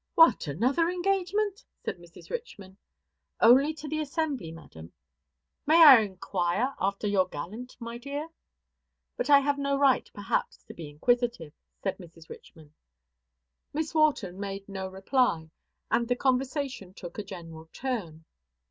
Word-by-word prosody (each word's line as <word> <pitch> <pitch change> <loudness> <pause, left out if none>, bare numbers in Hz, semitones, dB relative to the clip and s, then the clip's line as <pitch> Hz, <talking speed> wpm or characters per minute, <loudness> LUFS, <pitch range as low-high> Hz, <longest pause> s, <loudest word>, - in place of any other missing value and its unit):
"What, 325 - +5
another 255 - +1
engagement!" 390 +4 -1 0.2
said - - -3
Mrs. 175 -1 -15
Richman. 205 - -7 0.6
"Only 265 +6 +6
to 305 0 -8
the 310 +1 -2
assembly, 285 - -2
madam." 85 - -12 0.7
"May 330 +2 +7
I 270 -5 +11
inquire 195 +3 -1
after 195 +2 -1
your 195 -3 +2
gallant, 210 +11 -8
my 235 0 -7
dear? 285 +4 -5 0.9
But - - -3
I 280 -1 +8
have 285 0 0
no 280 0 0
right, 275 -2 +3
perhaps, 205 -1 -3
to - - -11
be 160 -3 -9
inquisitive," 235 0 0 0.3
said 195 - -2
Mrs. 165 -2 -14
Richman. 155 -2 -14 1.0
Miss 310 +1 -2
Wharton 280 - +1
made 195 -1 -5
no 190 -1 -5
reply, 190 - 0 0.4
and 235 - +2
the 245 - +1
conversation 255 - -1
took 175 +3 -9
a - - -3
general 165 -4 -10
turn. 185 -12 -5
235 Hz, 140 wpm, -28 LUFS, 180-285 Hz, 1.0 s, I